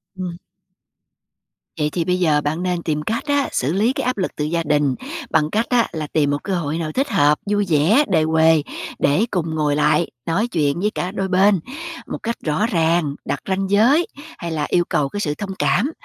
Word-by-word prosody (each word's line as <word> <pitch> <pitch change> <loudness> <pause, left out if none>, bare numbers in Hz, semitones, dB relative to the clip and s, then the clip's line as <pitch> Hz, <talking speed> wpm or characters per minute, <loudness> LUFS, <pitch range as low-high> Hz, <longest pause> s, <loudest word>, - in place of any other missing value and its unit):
Ừm. 180 -2 -5 1.4
Vậy 150 0 +1
thì 165 +2 -2
bây 180 +1 +1
giờ 155 -4 +3
bạn 155 +4 -2
nên 180 -2 -1
tìm 150 -2 -1
cách 220 +9 -2
á, 285 -1 +1
xử 135 +5 0
lý 215 +7 +2
cái - - -3
áp 255 -1 0
lực 185 - -1
từ 150 - -2
gia 165 +2 -1
đình 145 -3 +1 0.3
bằng 155 -2 +2
cách 220 +6 0
á, 240 -2 +3
là 155 -2 -4
tìm 145 -1 +1
một 145 - -2
cơ 195 - -1
hội 160 -3 -2
nào 160 -2 -3
thích 275 - -1
hợp, 150 - +3
vui 205 0 +1
vẻ, 170 - +4
đề 165 -6 +2
huề, 160 -1 +4 0.4
để 145 +10 +3
cùng 165 -4 -1
ngồi 150 -2 +1
lại 150 +3 +2 0.2
nói 195 +8 0
chuyện 150 -7 0
với 210 +3 +1
cả 180 - -2
đôi 195 -1 -2
bên 190 +1 +4 0.5
một - - -4
cách 235 0 -1
rõ 155 +7 +1
ràng. 165 -5 +1
Đặt - - -2
ranh 190 +1 0
giới 245 - +4 0.3
hay 170 -1 -5
là 155 -2 -1
yêu 175 - +3
cầu 140 -2 +1
cái 205 - -5
sự 150 -7 -1
thông 200 +3 -6
cảm, 255 - +2
170 Hz, 215 wpm, -20 LUFS, 150-200 Hz, 1.4 s, vẻ